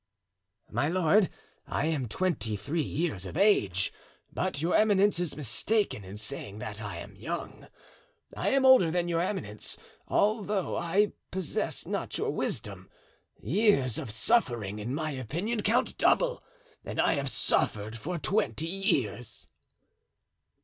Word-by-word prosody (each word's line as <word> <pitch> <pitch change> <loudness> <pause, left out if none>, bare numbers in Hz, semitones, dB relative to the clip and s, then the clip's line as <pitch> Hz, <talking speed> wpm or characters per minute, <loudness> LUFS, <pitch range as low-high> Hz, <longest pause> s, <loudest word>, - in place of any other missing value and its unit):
"My 145 - +1
lord, 185 +3 +3 0.4
I - - -1
am 150 -6 0
twenty 115 - 0
three 155 +11 -2
years 145 - -2
of 90 - -6
age; 100 - +3 0.4
but - - -1
your 165 +4 0
eminence 205 -3 +4
is 175 -4 -2
mistaken 150 - +1
in 95 +2 -9
saying 105 -1 -7
that 105 0 -6
I 100 -5 -5
am 100 +4 -9
young. 160 - -6 0.7
I - - 0
am 270 -1 +3
older 260 -10 +7
than 175 +1 0
your 170 -1 +1
eminence, 165 - -3 0.3
although 205 -2 +1
I 190 +5 +2 0.2
possess 185 -3 -2
not - - -3
your - - -1
wisdom. - - -3 0.5
Years 140 - +3
of - - -5
suffering, 110 - +2
in 120 +6 -3
my 155 0 -2
opinion, 170 - -2
count 225 +4 +1
double, - - +3 0.4
and - - -5
I - - +4
have 140 -3 -1
suffered 105 -3 0
for 165 +10 -4
twenty 160 - 0
years." 165 - -2
160 Hz, 135 wpm, -29 LUFS, -, 0.7 s, older